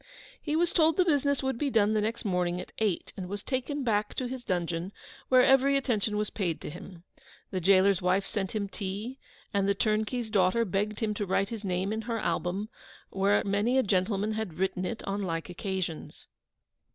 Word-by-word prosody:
He 300 -1 -1
was 340 +1 +2
told 320 -2 +4
the 365 - +4
business 285 -4 +2
would 265 -3 -1
be 290 - +1
done 215 -4 +3
the 215 - +2
next 225 +3 -2
morning 180 -2 0
at - - -8
eight, 210 -6 -1
and 180 -2 -6
was 205 +1 -5
taken 275 +2 -2
back 210 -3 0
to 255 - -2
his 250 0 -5
dungeon, 175 -1 -2 0.4
where 255 -1 +6
every 270 +1 +5
attention 220 -6 0
was 210 0 -1
paid 175 -6 -2
to - - -6
him. 175 +1 -11 0.5
The 185 - -1
gaoler's 190 +1 +4
wife 185 +2 +2
sent 195 -2 -3
him 205 -2 -1
tea, 205 +6 -5 0.3
and 200 -1 +2
the 200 - +2
turnkey's 220 +2 0
daughter 205 +3 +3
begged 205 +3 -1
him 215 -1 0
to 205 0 -2
write 195 +2 +1
his 225 -2 -6
name 190 +2 -1
in 220 - -2
her 230 +1 -3
album, 185 +2 -1 0.4
where 195 +2 +3
a - - -6
many 205 +6 +2
gentlemen 200 +2 +1
had 215 -6 -3
written 190 0 -1
it 230 - -5
on 200 +1 -1
like 165 -2 -3
occasions! 185 -3 -4
205 Hz, 200 wpm, -29 LUFS, 190-235 Hz, 0.5 s, where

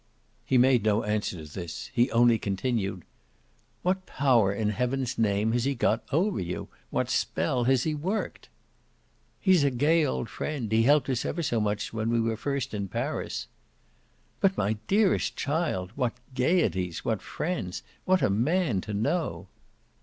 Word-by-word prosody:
He 130 +2 +2
made 125 -1 +5
no 110 0 +2
answer 105 -6 -2
to 75 - -13
this; 85 -3 -6
he 120 +2 +3
only 120 -1 +4
continued: 100 -3 -2 0.8
"What 185 +1 0
power, 120 -8 +3
in 105 +1 -1
heaven's 125 +4 -1
name, 105 0 +2
has 120 0 +1
he 140 0 0
got 115 -1 +1
over 185 +8 +1
you? 90 -1 -4 0.2
What - - 0
spell 125 -2 0
has 130 -1 +3
he 155 - 0
worked?" 185 +9 -3 0.9
"He's 185 -6 +4
a 140 - +4
gay 150 +6 +3
old 130 -4 -1
friend 130 -7 -4
he 110 +1 +4
helped 145 +5 +4
us 130 -3 0
ever 170 - -2
so 120 -6 +1
much 105 0 -2
when 110 0 -1
we 115 0 +2
were 115 0 0
first 135 +2 -3
in 100 -2 -2
Paris." - - -3 0.9
"But, 195 -1 +2
my 105 +2 0
dearest 200 0 +2
child, 145 - -1
what 125 -4 0 0.2
'gaieties,' 125 - +1
what 110 -3 0
friends 155 - -4 0.2
what 185 0 +2
a - - +4
man 125 - +1
to 105 +2 -5
know!" 100 - -1
120 Hz, 160 wpm, -27 LUFS, 105-145 Hz, 0.9 s, made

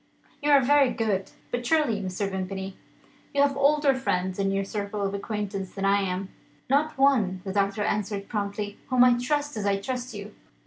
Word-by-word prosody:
"You 295 - 0
are 285 -1 +7
very 280 0 +4
good. 210 -5 -1 0.2
But 245 0 -2
surely, 255 -7 +2
Mr. 190 +1 -2
Vimpany, 190 0 -4 0.6
you 280 - +4
have 280 -1 +2
older 285 0 +4
friends 185 -8 -1
in 195 0 +1
your 195 0 0
circle 205 0 -3
of 195 0 -1
acquaintance 200 -2 -4
than 195 -1 -2
I 200 +1 +3
am." 190 0 -3 0.4
"Not 295 +2 +2
one," 225 -10 +3
the 190 - -4
doctor 200 +1 +1
answered 200 -1 -2
promptly, 205 -1 -3
"whom 255 -2 +5
I 245 -1 +5
trust 290 +3 -1
as 205 -1 -1
I 200 0 +2
trust 250 +2 -4
you. 205 +1 -8
205 Hz, 185 wpm, -26 LUFS, 195-260 Hz, 0.6 s, are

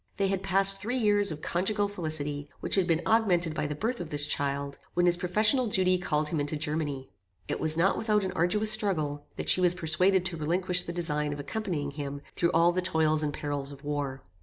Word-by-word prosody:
"They 195 -1 +1
had 195 -1 -1
passed 195 0 +4
three 235 +5 -2
years 205 -4 +4
of 155 -1 -8
conjugal 205 +4 0
felicity, 155 -6 -4
which - - -4
had 190 -3 +3
been 165 0 +1
augmented 180 -8 +2
by 150 -1 -2
the 150 - -4
birth 230 - -3
of 175 - -6
this 145 -1 0
child; 140 -1 -2 0.2
when 175 - +2
his 175 0 +5
professional 210 +8 +2
duty 185 -3 +2
called 150 -3 -1
him 160 - -2
into 145 +2 -2
Germany. 150 -4 -3 0.4
It - - -3
was 160 0 +5
not 185 +4 +2
without 215 -2 +1
an 190 - -2
arduous 190 +5 +1
struggle, 155 -9 0
that - - -6
she 185 - +4
was 180 -1 +4
persuaded 180 +3 +1
to 180 -3 -3
relinquish 180 +3 0
the 170 - -6
design 150 -4 -2
of 145 - -8
accompanying 150 -2 -4
him 140 0 -6
through 170 - +1
all 165 +2 +4
the 185 +1 -1
toils 160 -3 +1
and 150 -1 -1
perils 145 -1 -4
of 140 0 -13
war. 145 -2 -4
170 Hz, 215 wpm, -28 LUFS, 150-195 Hz, 0.4 s, his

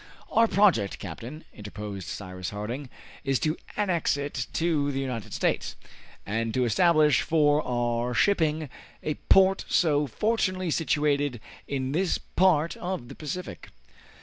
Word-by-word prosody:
"Our 230 0 +5
project, 180 - +3
captain," 115 - -8
interposed 105 -2 -7
Cyrus 95 -2 -5
Harding, 120 +7 -5 0.3
"is 135 -1 +1
to 155 0 +1 0.2
annex 180 -8 +1
it 140 -3 -3
to 155 -4 +1
the 135 - -2
United 125 -6 -4
States, - - -1 0.5
and 115 +2 -1
to 130 -1 +2
establish 150 - +4
for 150 -1 +3
our 120 -1 -1
shipping 155 - +2 0.4
a 155 - 0 0.2
port 190 0 +5
so 150 -4 +3
fortunately 185 - 0
situated 145 -5 +1 0.3
in 135 -1 -2
this 180 +5 +1
part 170 -3 +2
of 175 -9 -4
the - - -9
Pacific." 170 +4 -6
145 Hz, 130 wpm, -27 LUFS, 120-170 Hz, 0.5 s, Our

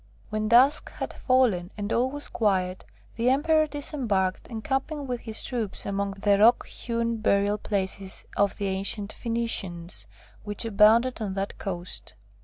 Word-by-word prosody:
When 215 0 -1
dusk 260 +7 +5
had - - -5
fallen, 230 -9 +2
and 205 +1 -2
all 250 +2 +2
was 290 +2 -5
quiet, 185 -4 0 0.3
the 235 +2 +2
Emperor 310 +3 +3
disembarked, 245 -10 -1
encamping 270 +6 -3
with 250 -2 -3
his 220 -2 -1
troops 230 -6 -2
among 200 0 -2
the 200 0 +2
rock 230 +3 +5
hewn 230 -1 -2
burial 205 -1 +2
places 195 -1 -3
of 200 -1 +1
the 200 - -2
ancient 195 +2 -1
Phoenicians, 190 - -2 0.4
which 205 +1 0
abounded 225 +3 +4
on 200 -3 -2
that 195 0 -3
coast. 180 -2 -4
215 Hz, 145 wpm, -26 LUFS, 195-245 Hz, 0.4 s, dusk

